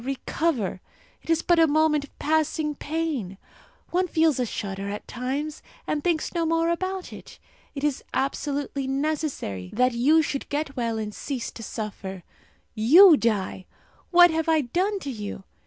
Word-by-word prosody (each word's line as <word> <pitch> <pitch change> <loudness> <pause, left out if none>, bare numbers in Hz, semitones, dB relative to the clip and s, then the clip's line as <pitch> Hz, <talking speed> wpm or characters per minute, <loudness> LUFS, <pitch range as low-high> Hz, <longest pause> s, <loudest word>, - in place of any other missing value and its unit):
recover! 265 - -2 0.4
It - - -17
is 330 -1 +2
but 345 -1 +3
a 325 - +6
moment 305 -1 +2
of 285 - -15
passing 310 0 0
pain. 290 - -3 0.5
One 365 +1 +1
feels 320 -5 +2
a 250 - 0
shudder 195 -1 -4
at 205 +1 -6
times, 275 +5 -4 0.2
and 295 -1 -2
thinks 335 -3 0
no 340 -1 0
more 330 +1 +1
about 370 +2 -3
it. - - -12 0.4
It 280 - -5
is 295 -3 0
absolutely 275 0 -2
necessary 275 - -2
that 250 +1 +2
you 295 +7 +4
should 280 -2 -4
get 290 -1 -2
well 230 -2 -1
and 210 -1 -4
cease 260 0 -4
to - - -10
suffer. 195 -4 -6 0.5
You 315 - +8
die! 205 -7 -1 0.4
What 350 -1 +7
have 320 0 -1
I 320 -1 +4
done 365 - 0
to 280 - -4
you? 205 -4 -6
290 Hz, 160 wpm, -25 LUFS, 235-320 Hz, 0.5 s, You